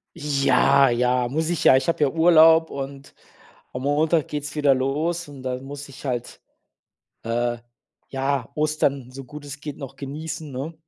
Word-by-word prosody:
Ja, 140 -2 +3
ja, 125 +1 +1
muss 155 +6 -2
ich 175 -3 -1
ja, - - +7
ich 130 - -2
habe 170 - 0
ja 145 - +3
Urlaub 160 0 +5
und 140 0 -7 0.6
am 125 - -5
Montag 155 +2 +1
geht's 150 0 -5
wieder 145 -2 +4
los 150 +6 -1
und 140 -3 -11
dann 130 0 -4
muss 145 +1 -8
ich 140 +2 -12
halt, 125 -3 -4 0.8
äh, 120 +1 -1 0.5
ja, 135 0 -2
Ostern, 145 -4 0
so 135 +1 -9
gut 150 +2 -11
es 145 0 -9
geht 150 -1 -7
noch 135 -1 -8
genießen, 150 +2 -6
ne? 135 +6 -5
140 Hz, 165 wpm, -23 LUFS, 130-155 Hz, 0.8 s, ja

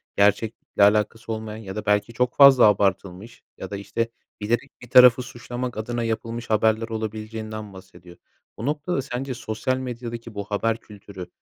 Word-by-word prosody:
gerçeklikle 105 +1 +1
alakası 105 +2 +2
olmayan 110 -1 -6
ya 95 -1 -7
da 105 -1 -5
belki 105 +2 +1
çok 125 +2 0
fazla 140 -4 +8
abartılmış 100 +1 -1
ya 95 - -7
da, 100 - -3
işte, 115 +3 -3 0.3
bilerek 120 +6 -1
bir 125 - -12
tarafı 125 0 +8
suçlamak 120 0 -6
adına 120 +2 -3
yapılmış 115 +1 -4
haberler 110 +1 +2
olabileceğinden 110 -1 -5
bahsediyor. 90 -2 -14 0.4
O 115 - -5
noktada 150 +1 -1
sence 130 0 -4
sosyal 120 +3 -2
medyadaki 120 -3 -6
bu 100 - -3
haber 110 +3 -1
kültürü, 100 -4 -11
110 Hz, 150 wpm, -24 LUFS, 105-120 Hz, 0.4 s, fazla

